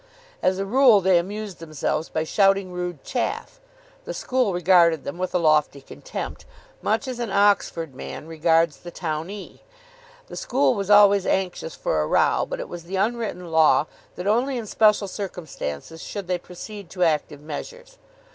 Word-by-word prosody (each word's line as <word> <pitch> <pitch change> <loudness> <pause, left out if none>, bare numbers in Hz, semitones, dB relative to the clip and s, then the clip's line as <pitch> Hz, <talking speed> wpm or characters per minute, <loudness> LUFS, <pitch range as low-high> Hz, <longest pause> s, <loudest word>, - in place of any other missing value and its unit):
As 185 0 +2
a 195 - -2
rule, 245 0 +6
they 185 -2 +4
amused 205 +1 -6
themselves 155 0 -3
by 160 - -1
shouting 195 +2 +2
rude 180 -4 -5
chaff. 270 - -3 0.4
The - - -5
school 255 -5 0
regarded 175 -3 +4
them 140 +5 -6
with 185 0 -3
a - - +6
lofty 155 -4 +2
contempt, - - -7 0.4
much 275 - 0
as 255 -2 -5
an 235 -2 -2
Oxford 195 -6 +2
man 130 - -8
regards 165 -1 +2
the 175 - -10
townee. 165 +5 -5 0.7
The - - -10
school 265 +2 +1
was 200 -3 -4
always 205 -1 +6
anxious 180 -4 -1
for 80 - 0
a 75 - -1
row, - - +2
but - - -4
it - - -5
was 175 -1 -8
the 190 +3 -5
unwritten 200 -4 -2
law 160 -1 +5 0.3
that 180 - -6
only 245 +6 +1
in 230 - -4
special 210 -1 +3
circumstances 165 - -6
should 200 -2 -6
they 180 -1 -1
proceed 200 +2 -10
to 180 -1 -1
active 150 -2 0
measures. - - -8
185 Hz, 165 wpm, -24 LUFS, 165-210 Hz, 0.7 s, rule